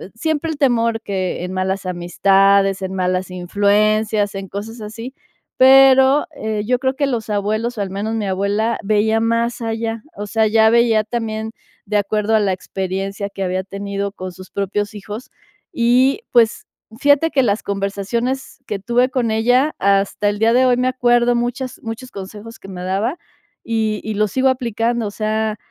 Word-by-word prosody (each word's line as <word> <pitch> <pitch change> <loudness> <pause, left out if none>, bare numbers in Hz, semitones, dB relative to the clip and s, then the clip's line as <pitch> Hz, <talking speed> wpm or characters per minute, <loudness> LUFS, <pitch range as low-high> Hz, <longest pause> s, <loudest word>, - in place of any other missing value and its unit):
siempre 315 +6 -1
el 310 - -5
temor 230 -5 +2
que 185 -3 -3
en 180 - -6
malas 190 +1 -2
amistades, 195 +2 +2
en 190 0 -4
malas 185 0 -1
influencias, 205 +3 +1
en 195 -1 -6
cosas 220 +3 -7
así, 225 +4 -7 0.5
pero, 265 +1 +6
eh, 215 -1 -3
yo 250 +1 +2
creo 260 +1 0
que 280 0 0
los 235 -5 -3
abuelos, 215 +4 -1
o 205 - -2
al 195 - -2
menos 205 +3 -3
mi 215 -3 -2
abuela, 200 +4 0
veía 215 +2 +2
más 230 +1 0
allá. 225 0 -3
O 205 +1 -5
sea, 220 +1 +1
ella 220 +1 +4
veía 230 -2 +4
también 220 -1 -3 0.4
de 210 0 0
acuerdo 210 +2 0
a - - +4
la 200 -2 +1
experiencia 195 +2 -4
que - - -7
había 185 0 -1
tenido 200 +1 -4
con 185 -2 -7
sus 185 +1 -13
propios 205 +1 -2
hijos 210 +4 -8 0.4
y, 255 - +3
pues, 230 -3 +3 0.3
fíjate 290 +3 +3
que 270 - +3
las 210 -2 0
conversaciones 200 +6 -3
que 205 - -2
tuve 240 +5 +1
con 245 -4 -1
ella 245 +7 +2
hasta 200 +1 +2
el 205 - -2
día 225 +1 +3
de 255 +2 +4
hoy 250 -1 +3
me 250 +1 +1
acuerdo 240 -1 +2
muchas 250 +2 -3
muchos 225 +3 -7
consejos 210 +3 -9
que - - -12
me 180 -2 -7
daba 200 - -1 0.5
y 220 -2 -1
y 220 - -3
lo 215 +1 +2
sigo 265 +6 +2
aplicando, 235 -2 -1
o - - -5
sea 215 0 -1
220 Hz, 175 wpm, -19 LUFS, 200-240 Hz, 0.5 s, pero